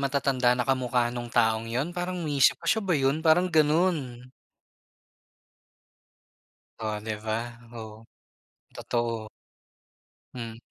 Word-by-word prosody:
matatanda 135 -3 +2
na 125 - 0
kamukha 125 -2 +1
nung 120 -1 -5
taong 115 -1 +1
yun, 135 +9 -2
parang 180 -1 -3
iniisip 140 -4 +4
ko, 170 - -17
"siya 220 +7 +2
ba 185 -6 +1
yun?" 135 +3 +1
parang 175 +3 +3
ganun. 150 -6 +1 2.5
Oh 110 -1 -2
'di 110 +1 -4
ba? 110 0 0 0.3
Oo. 110 -1 -9 0.7
Totoo. 115 -2 -2 1.1
Hmm. 115 -2 -6
125 Hz, 110 wpm, -27 LUFS, 115-155 Hz, 2.5 s, iniisip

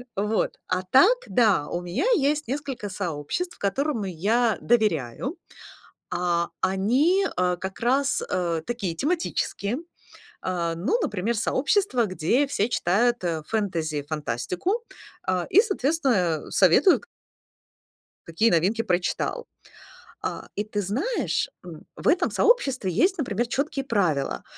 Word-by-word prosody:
Вот, 210 +2 -1
а 185 0 -1
так 355 - +5
да, 210 - +3
у 175 - -3
меня 180 - -2
есть 300 -1 +1
несколько 270 -4 -4
сообществ, 185 - -4
которым 250 +4 -1
я 210 +6 +1
доверяю, 215 - 0 0.7
а 175 -1 0
они, 255 - +2
а, 180 0 +1
как 190 +2 -6
раз, 270 +4 +2
э, 170 -3 -1
такие 205 -8 -3
тематические. 275 - -1 0.6
А, 170 -2 -1
ну, 195 - 0
например, 215 - -1
сообщество, 260 - +1
где 205 - +1
все 225 -5 0
читают, 235 +1 +1
э, 165 -3 -1
фэнтези, 165 -9 -1
фантастику, 160 - -2 0.4
а, 185 -2 0
и 390 - +6
соответственно, 265 - 0
э, - - -12
советуют 195 - +5 1.2
какие 165 +8 +2
новинки 190 +7 +2
прочитал. 185 - -1 0.7
А, - - -4
и 205 - -1
ты 205 -1 -2
знаешь, 235 - -1 0.2
м, 165 -3 -10
в - - -4
этом 355 - +3
сообществе 270 - +2
есть, 370 - +2
например, 240 - -1
чёткие 275 +2 -2
правила, 160 - 0
210 Hz, 120 wpm, -25 LUFS, 175-275 Hz, 1.2 s, и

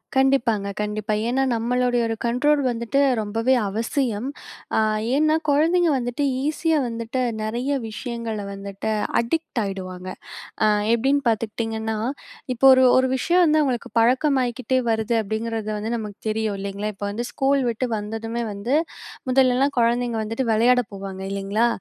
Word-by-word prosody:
கண்டிப்பாங்க. 255 -6 +2
கண்டிப்பா. 210 +1 -2
ஏன்னா 260 +3 +1
நம்மளுடைய 245 +1 +1
ஒரு 225 - -2
கண்ட்ரோல் 285 +5 +2
வந்துட்டு 235 +3 -1 0.2
ரொம்பவே 225 +5 +1 0.2
அவசியம். 230 +2 -1 0.5
அ - - +5 0.4
ஏன்னா, 310 +1 +3
குழந்தைங்க 330 +4 +3
வந்துட்டு, 245 +3 -2 0.2
ஈஸியா 315 +1 +1
வந்துட்டு, 230 +2 -3 0.2
நெறைய 240 +6 -2 0.2
விஷயங்கள 225 -2 -5
வந்துட்டு 200 +2 -5 0.3
அடிக்ட் 285 +2 -2
ஆயிடுவாங்க. 185 -2 -6 0.6
அ - - +5 0.3
எப்படீன்னு 275 +4 +2
பார்த்துக்கிட்டீங்கன்னா, 220 0 -2 0.6
இப்போ 270 +3 +3
ஒரு 260 0 +6
ஒரு 260 0 +3
விஷயம் 350 +7 +3
வந்து 310 -1 +4
அவங்களுக்கு 250 -4 -2
பழக்கமாயிக்கிட்டே 255 0 +2
வருது, 220 +1 0
அப்படீங்கிறது 220 +1 -3
வந்து 220 +3 -3
நமக்கு 210 -3 -6
தெரியும், 215 -1 -1
இல்லைங்களா? 200 +2 -3
இப்ப 205 - -7
வந்து 235 +4 -3
ஸ்கூல் 275 0 +1
விட்டு 240 +2 -1
வந்ததுமே 225 +3 -4
வந்து, 230 +8 -1 0.5
முதல்லலாம் 265 +2 +3
குழந்தைங்க 235 0 +1
வந்துட்டு 225 +4 -2
வெளையாட 245 +3 +4
போவாங்க, 195 -1 -7
இல்லைங்களா? 200 +4 0
235 Hz, 130 wpm, -23 LUFS, 215-260 Hz, 0.6 s, ஒரு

